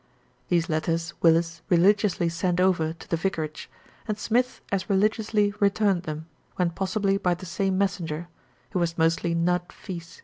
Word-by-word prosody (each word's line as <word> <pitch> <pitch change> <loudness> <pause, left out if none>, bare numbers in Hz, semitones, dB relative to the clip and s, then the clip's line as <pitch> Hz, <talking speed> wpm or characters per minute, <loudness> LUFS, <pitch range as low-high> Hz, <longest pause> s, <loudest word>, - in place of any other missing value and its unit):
These 170 -1 +2
letters 165 +1 -1
Willis 165 0 +3
religiously 190 0 +3
sent 175 +1 0
over 180 -4 +2
to 165 - -14
the 165 - 0
vicarage, 160 -4 -3 0.4
and 215 -2 -1
Smith 245 +4 0
as 195 0 -1
religiously 210 +1 +2
returned 200 -2 +2
them, 155 0 -5 0.3
when 180 -2 +1
possible 195 +2 0
by 180 -3 +1
the 180 - -10
same 190 +2 -1
messenger, 175 -4 -1 0.4
who 185 - 0
was 170 -1 -1
mostly 165 +1 +2
Nudd 175 +1 0
fits. 170 -4 -9
180 Hz, 150 wpm, -26 LUFS, 165-195 Hz, 0.4 s, Willis